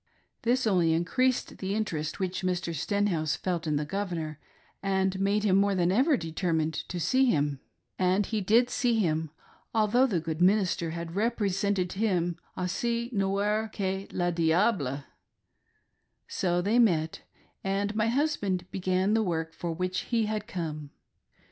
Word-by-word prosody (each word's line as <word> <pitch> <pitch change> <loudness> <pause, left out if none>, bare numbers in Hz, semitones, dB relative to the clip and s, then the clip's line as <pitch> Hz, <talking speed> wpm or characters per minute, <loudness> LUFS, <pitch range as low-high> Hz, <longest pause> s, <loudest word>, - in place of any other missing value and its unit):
This 245 +2 +1
only 175 -6 +3
increased 255 +10 0
the 195 +1 -2
interest 160 -8 -2
which 185 -1 -2
Mr. 180 -2 -1
Stenhouse 165 -2 0
felt 175 -3 -2
in 150 - +1
the 150 +1 0
Governor, 165 -4 -3 0.4
and 190 -1 0
made 200 +2 +1
him 195 -3 +3
more 200 0 +3
than 175 -1 +2
ever 265 - +3
determined 160 -2 -1
to 175 - -5
see 260 +10 +3
him; 145 - +1 0.4
and 185 +2 +2
he 215 0 -2
did 230 +6 +3
see 240 -2 +1
him, 160 -6 0 0.5
although 225 +4 +4
the 190 -9 0
good 160 0 -4
minister 185 -3 +3
had 170 +1 -6
represented 200 -4 0
him 180 -5 0 0.2
"aussi 235 +6 -1
noir 205 +2 +1
que 195 -1 -2
le 175 -1 0
diable" 165 - +1 1.2
So 175 -1 0
they 220 +5 +3
met; 165 -9 +2 0.4
and 200 +2 -1
my 215 0 +2
husband 225 - 0
began 185 +2 +1
the 225 - +3
work 165 -5 -2
for 170 - -4
which 180 +2 -2
he 230 -2 +2
had 215 0 -3
come. 155 -8 -5
190 Hz, 150 wpm, -28 LUFS, 170-210 Hz, 1.2 s, although